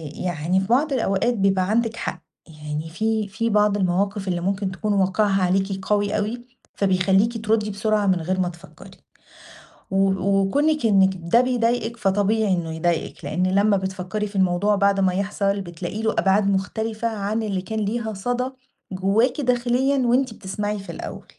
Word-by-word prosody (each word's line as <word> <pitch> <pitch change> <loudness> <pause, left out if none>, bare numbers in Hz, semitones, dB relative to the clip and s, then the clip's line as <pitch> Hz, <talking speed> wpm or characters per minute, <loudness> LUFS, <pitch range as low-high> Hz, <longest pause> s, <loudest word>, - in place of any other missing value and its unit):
يعني 175 +1 -1
في 190 - -2
بعض 275 +5 +2
الأوقات 230 0 +1
بيبقى 195 -3 +1
عندِك 225 +1 +1
حق، - - -5 0.3
يعني 150 0 -6
في 215 +4 -1
في 230 +3 -2
بعض 210 -1 +3
المواقف 195 +2 0
اللي 175 -1 -1
ممكن 195 +1 -1
تكون 210 +2 -2
واقعها 195 0 +2
عليكِ 195 +1 0
قوي 205 0 +1
أوي، 235 +4 -3 0.3
فبيخليكِ 195 +4 +1
تردي 215 -1 +1
بسرعة 210 +1 0
من 185 -3 +2
غير 185 +3 -1
ما 180 -1 +1
تفكري، 175 -1 -14 1.0
و 195 0 +3
وكونِك 200 +10 +1
إنِك 195 -3 +5
ده 200 +9 +4
بيضايقِك 240 -2 0
فطبيعي 205 0 +1
إنه 170 -3 -2
يضايقِك، 165 0 -2
لأن 180 +1 0
لمّا 200 0 +4
بتفكري 190 +2 -3
في 200 - -13
الموضوع 190 +2 +2
بعد 200 0 +2
ما 185 -2 +2
يحصل 200 +1 -1
بتلاقي 175 +4 -6
له 220 - +1
أبعاد 195 0 +2
مختلفة 220 +4 -1
عن 215 0 -2
اللي 195 -3 -2
كان 220 +4 -4
ليها 220 +1 -2
صدى 245 +6 -2 0.4
جواكِ 210 +9 +1
داخليًا، 250 +2 +1
وأنتِ 250 0 +2
بتسمعي 205 +1 -4
في 195 - -8
الأول، - - -8
200 Hz, 160 wpm, -23 LUFS, 190-220 Hz, 1.0 s, إنِك